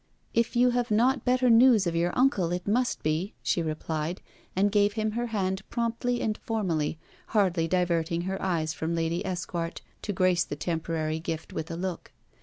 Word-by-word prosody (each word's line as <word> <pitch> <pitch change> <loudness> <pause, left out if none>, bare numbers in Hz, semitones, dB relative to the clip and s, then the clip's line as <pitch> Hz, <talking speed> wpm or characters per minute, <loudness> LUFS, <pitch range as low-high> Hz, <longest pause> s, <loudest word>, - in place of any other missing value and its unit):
'If 230 +1 +1
you 245 +1 +5
have 245 0 0
not 250 +5 +2
better 255 0 +3
news 230 -3 +6
of 170 -1 -1
your 170 +1 +1
uncle, 250 -10 +3
it 180 +1 -3
must 245 +4 +1
be,' 155 +6 -1
she 175 - +1
replied, 160 +1 -3 0.4
and 200 +2 +3
gave 205 0 +3
him 215 0 -1
her 240 +2 -2
hand 190 -4 -1
promptly 235 +1 -1
and 215 -1 -1
formally, 170 -9 -1 0.3
hardly 185 -6 +2
diverting 170 -1 +1
her 190 +2 -3
eyes 165 -4 0
from 160 +1 -2
Lady 165 +2 -1
Esquart 175 -3 -3 0.2
to 210 - -3
grace 185 -2 +3
the - - -5
temporary 160 0 -2
gift 160 -1 -5
with 160 +2 -4
a 165 - -4
look. 180 0 -4
185 Hz, 180 wpm, -28 LUFS, 165-225 Hz, 0.4 s, news